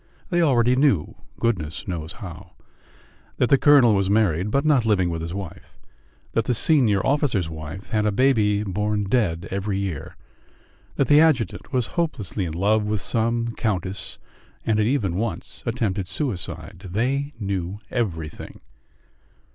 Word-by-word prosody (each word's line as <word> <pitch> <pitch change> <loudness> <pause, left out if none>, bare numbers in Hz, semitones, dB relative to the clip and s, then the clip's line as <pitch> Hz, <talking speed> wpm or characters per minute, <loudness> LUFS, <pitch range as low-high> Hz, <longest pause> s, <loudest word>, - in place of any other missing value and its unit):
They 175 -1 +3
already 125 -5 +4
knew, 130 - +2 0.3
goodness 85 -10 -2
knows 85 -2 -4
how, 95 -3 -10 0.8
that 125 - +2
the 140 - +6
colonel 140 -6 +6
was 100 -1 +1
married, 100 -3 +2
but 140 +6 +1
not 145 -6 +4
living 95 -6 +2
with 85 -1 -3
his 85 0 -5
wife; 100 -4 -8 0.5
that 115 - 0
the 125 - +1
senior 110 - +3
officer's 135 - +1
wife 80 +5 -8
had 105 -1 +1
a - - +2
baby 105 -3 +2
born 105 +1 -1
dead 95 -5 0
every 100 +1 -2
year; 95 -7 -4 0.8
that 140 - +2
the 145 +4 +6
adjutant 150 -8 +1
was 125 -4 +1
hopelessly 110 - -2
in 80 - -4
love 105 +5 +2
with 105 0 -1
some 115 +2 -1
countess, 95 -3 -3 0.5
and 110 -1 +2
had 105 - +2
even 105 -10 0
once 115 +2 -4
attempted 105 -5 -1
suicide. 100 - -4
They 135 +9 -1
knew 95 -2 -3
everything. 80 -10 -4
105 Hz, 145 wpm, -23 LUFS, 95-120 Hz, 0.8 s, the